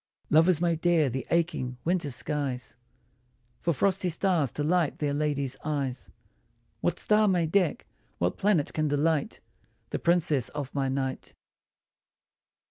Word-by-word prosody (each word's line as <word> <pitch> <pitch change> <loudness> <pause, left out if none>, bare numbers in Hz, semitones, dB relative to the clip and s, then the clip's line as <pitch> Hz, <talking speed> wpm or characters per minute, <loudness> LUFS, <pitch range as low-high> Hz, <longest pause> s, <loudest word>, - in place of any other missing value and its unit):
Lovers 165 +2 +5
may 170 -1 +1
dare 160 -4 +2
the 130 +2 -4
aching 165 -7 0
winter 170 -3 0
skies 135 -1 -2 0.9
For 170 - +1
frosty 185 +4 +1
stars 170 - +1
to 145 - -2
light 165 0 +1
their 145 -2 -1
ladies' 140 -3 -1
eyes; 140 -4 -3 0.7
What - - 0
star 215 0 +3
may 180 -4 +2
deck, 175 -1 +1 0.3
what 90 +1 0
planet 190 -8 +2
can 155 -1 0
delight 145 +1 0 0.5
The - - -2
princess 160 -7 +2
of 140 -2 -5
my 135 -2 0
night 130 0 -3
155 Hz, 130 wpm, -28 LUFS, 140-175 Hz, 0.9 s, Lovers